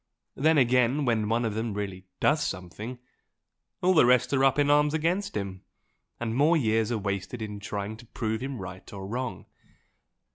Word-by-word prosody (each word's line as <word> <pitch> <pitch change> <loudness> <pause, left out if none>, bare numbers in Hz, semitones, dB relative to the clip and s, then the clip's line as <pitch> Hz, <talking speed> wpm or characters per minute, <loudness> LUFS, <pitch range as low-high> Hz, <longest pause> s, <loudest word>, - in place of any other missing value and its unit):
Then 155 +3 +3
again, 125 +2 +3
when 110 -3 +1
one 115 +1 +1
of 110 - -1
them 110 -1 -2
really 95 -2 -5
does 150 +1 +3
something, 105 +7 -5 0.9
all 185 +1 +5
the 165 - +6
rest 125 +2 +4
are 135 -1 +3
up 135 0 +4
in 145 0 +3
arms 150 +1 +4
against 180 +6 0
him, 95 -2 -5 0.6
and 115 -1 -2
more 155 +6 +4
years 110 -4 +1
are 120 - +1
wasted 100 +3 -3
in 105 -2 -5
trying 100 +1 -4
to 120 - -15
prove 110 -1 -3
him 135 0 -4
right 95 -2 -8
or 95 -1 -7
wrong. 125 +5 -4
115 Hz, 180 wpm, -27 LUFS, 105-140 Hz, 0.9 s, the